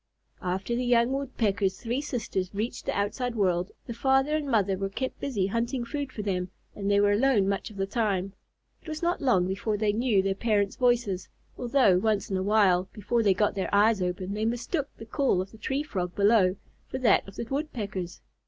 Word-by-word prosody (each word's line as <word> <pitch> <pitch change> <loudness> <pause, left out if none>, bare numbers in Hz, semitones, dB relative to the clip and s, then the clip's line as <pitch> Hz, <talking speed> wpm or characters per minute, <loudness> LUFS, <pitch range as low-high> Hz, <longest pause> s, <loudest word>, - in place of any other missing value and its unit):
After 190 +6 -2
the 250 - -1
young 240 0 +3
Woodpecker's 210 -8 -1
three 240 +4 -2
sisters 210 -9 -3
reached 220 +4 -3
the - - -1
outside 235 +4 -1
world, 185 -3 +1 0.2
the 235 - -5
father 270 +5 +2
and 305 -2 -2
mother 205 -5 +2
were 195 +1 -3
kept 260 +6 -4
busy 230 -9 -1
hunting 235 +4 -1
food 285 +1 -4
for 210 - -5
them, 180 -3 -1 0.3
and 200 -1 -2
they 200 0 +4
were 205 0 +4
alone 215 -2 +3
much 200 +3 -1
of 210 - -13
the 195 - 0
time. 195 -3 -1 0.5
It - - -19
was 310 +1 -5
not 345 +1 0
long 235 -10 +3
before 200 +3 -1
they 205 0 +1
knew 220 -4 +2
their 195 0 +1
parents' 205 -1 0
voices, 235 -8 +1 0.3
although, 245 -7 +3
once 210 0 0
in 190 - +1
a - - -1
while, 190 -3 +3
before 225 +3 0
they 200 -4 +3
got 210 +2 +2
their 195 -1 -2
eyes 205 0 +4
open, 180 +2 -2
they 210 +1 -2
mistook 245 +6 -1
the 225 - -9
call 260 -4 +1
of 190 +1 -4
the 220 - -15
Tree 270 +6 -1
Frog 180 - -4
below 200 -3 +4 0.3
for - - -4
that 255 -5 +3
of 195 - -11
the 235 - -4
Woodpeckers. 215 - -4
210 Hz, 210 wpm, -27 LUFS, 195-245 Hz, 0.5 s, they